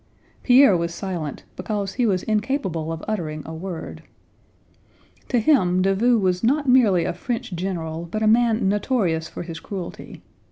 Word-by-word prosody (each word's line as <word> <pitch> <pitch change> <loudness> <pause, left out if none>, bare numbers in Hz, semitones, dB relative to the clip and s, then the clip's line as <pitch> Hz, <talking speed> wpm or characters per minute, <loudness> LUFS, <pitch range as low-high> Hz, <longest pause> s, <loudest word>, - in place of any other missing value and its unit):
Pierre 255 -5 +6
was 170 0 -2
silent 175 -7 -5
because 200 0 -3
he 245 -2 +1
was 185 -3 0
incapable 210 - -1
of 165 0 -6
uttering 155 -8 -3
a 160 - -7
word. 170 +1 -7 1.3
To 250 - +2
him 185 - +3
Davout 220 +5 +3
was 180 0 0
not 280 +5 +2
merely 215 -10 +4
a - - -1
French 245 -4 -4
general, 170 -2 -4
but 215 +4 -2
a - - +3
man 225 -2 +3
notorious 195 -6 0
for - - -7
his 165 -2 -7
cruelty. 190 -4 -8
195 Hz, 155 wpm, -22 LUFS, 170-230 Hz, 1.3 s, Pierre